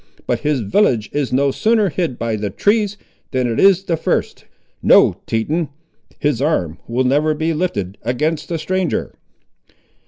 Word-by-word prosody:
But - - 0
his 150 -3 0
village 110 - +1
is 145 -3 -1
no 140 +2 +2
sooner 220 - +2
hid 160 -7 -2
by 115 -1 -2
the 105 -1 -3
trees, 205 - +1 0.3
than 130 -2 0
it 115 -2 -1
is 195 -1 +5
the 175 -4 0
first. - - -2 0.4
No, - - +5
Teton; 150 +9 -1 0.5
his 145 -4 0
arm 90 - 0
will 120 +3 0
never 150 +4 +2
be 160 +2 -1
lifted 105 - -3
against 150 +7 -1
the 170 - -1
stranger." 185 +2 -2
150 Hz, 155 wpm, -18 LUFS, 120-175 Hz, 0.5 s, is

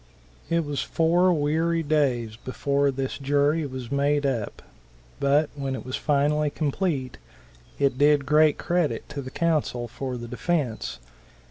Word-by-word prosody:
It 165 -1 +1
was 145 -3 -2
four 175 +5 +3
weary 165 +2 +1
days 130 -7 +1
before 140 +4 0
this 135 0 -3
jury 145 +3 +2
was 130 -2 -7
made 145 +1 +1
up, 120 -6 -2 0.6
but 145 +2 +2
when 135 -2 -3
it - - -7
was 130 - -3
finally 150 +1 +1
complete, 145 -3 -2 0.6
it 135 -2 +1
did 145 -1 +4
great 150 +1 +4
credit 175 -3 -1
to 150 -1 -5
the 130 - -7
counsel 150 -6 0
for 125 +2 -5
the 120 0 -7
defence. 125 - -2
145 Hz, 140 wpm, -25 LUFS, 130-155 Hz, 0.6 s, did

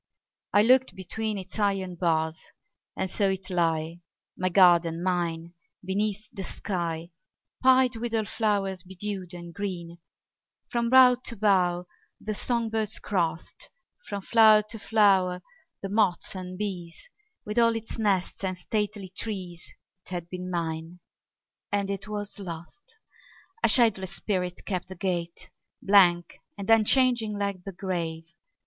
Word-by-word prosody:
I 205 - +5
looked 255 +3 +4
between 215 +3 -3
Its 195 +2 -8
iron 195 -3 0
bars; 160 -2 0 0.6
and - - 0
saw 200 +2 -1
it 190 0 -2
lie, 165 -1 0 0.3
My 185 0 0
garden, 175 -2 +4
mine, 170 -2 -1 0.3
beneath 205 +2 -1
the 195 - -5
sky, 170 -3 -4 0.5
Pied 255 -2 +5
with 230 0 -3
all 220 -1 +1
flowers 200 -4 0
bedewed 190 0 -5
and 170 -1 -9
green: 175 -3 -5 0.7
From 235 -1 0
bough 255 -1 +7
to 235 - -3
bough 180 -4 +2 0.3
the 215 - -4
song 235 +1 -1
birds 220 -1 -1
crossed, 170 -4 -3 0.4
From 200 -1 -4
flower 220 -1 +6
to 225 - -6
flower 190 -5 +3 0.4
the 195 - -3
moths 200 -4 +1
and 185 0 -6
bees; 180 -5 -5 0.5
With 210 +3 -1
all 230 -1 +4
its 225 +1 -6
nests 195 -3 0
and 185 -1 -2
stately 205 0 -3
trees 185 -6 -5 0.4
It - - -11
had 175 -2 -5
been 180 0 -5
mine, 165 0 -4 0.7
and 200 -1 0
it 195 +2 -5
was 205 0 -5
lost. 190 - -9 0.6
A - - +4
shadowless 195 -7 +3
spirit 180 -3 -3
kept 185 -3 -3
the 190 - -9
gate, 170 -2 -3 0.3
Blank 180 -4 +4 0.2
and 200 - -6
unchanging 225 -1 +3
like 200 -3 -3
the 195 - -5
grave. 170 -4 -3
190 Hz, 140 wpm, -27 LUFS, 175-215 Hz, 0.7 s, bough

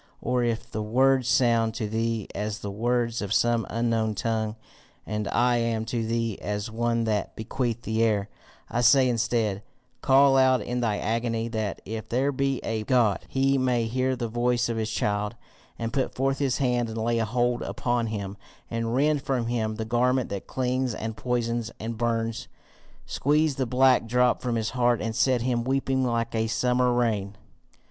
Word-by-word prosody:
Or 125 0 0
if 115 -1 -1
the 110 - -3
words 130 +3 +2
sound 115 -3 +3
to 110 - -2
thee 115 0 -1
as 105 +1 -3
the 100 - -4
words 120 +2 0
of 100 -2 -4
some 115 +1 +2
unknown 115 -1 0
tongue, 110 0 -1 0.5
and 105 -1 -3
I 120 0 +2
am 115 -1 -1
to 115 0 -2
thee 115 -2 -2
as 105 +1 -3
one 115 +1 0
that 105 -3 -1
beateth 115 +1 -3
the 110 +1 -1
air, 105 -3 +2 0.4
I 120 - -1
say 130 +2 +6
instead 115 -4 0 0.4
Call 135 +1 +5
aloud 130 -2 +4
in 125 +1 -2
thy 110 -4 0
agony, 115 +1 -1
that, 110 -3 -3
if 110 +2 -6
there 135 +4 +1
be 135 0 0
a 110 -1 -2
God, 115 -4 +2
he 135 0 +1
may 125 -2 +1
hear 130 +3 0
the 120 -2 -3
voice 120 +1 0
of 115 - -2
his 110 0 -1
child, 105 0 -1 0.4
and 115 0 -4
put 135 - -1
forth 135 +1 0
his 135 -3 +1
hand 125 -4 0
and 110 - -6
lay 115 +1 0
hold 120 +2 0
upon 120 -1 -1
him, 100 -2 -5 0.3
and 115 0 -1
rend 145 +2 +2
from 135 -4 -1
him 110 -2 -1
the 110 +1 -4
garment 125 +2 +1
that 100 -1 -5
clings 130 -2 -1
and 110 0 -4
poisons 120 -2 -1
and 115 +1 -4
burns, 115 -1 -1 0.6
squeeze 150 +2 +1
the 130 -1 -2
black 130 -1 +4
drop 125 +1 +2
from 125 -2 -1
his 110 -1 -1
heart, 120 -2 +2
and 110 +1 -3
set 125 -1 +2
him 120 -2 0
weeping 135 0 0
like 115 -1 -1
a 110 0 0
summer 125 +2 +2
rain. 110 -5 0
115 Hz, 180 wpm, -26 LUFS, 110-125 Hz, 0.6 s, say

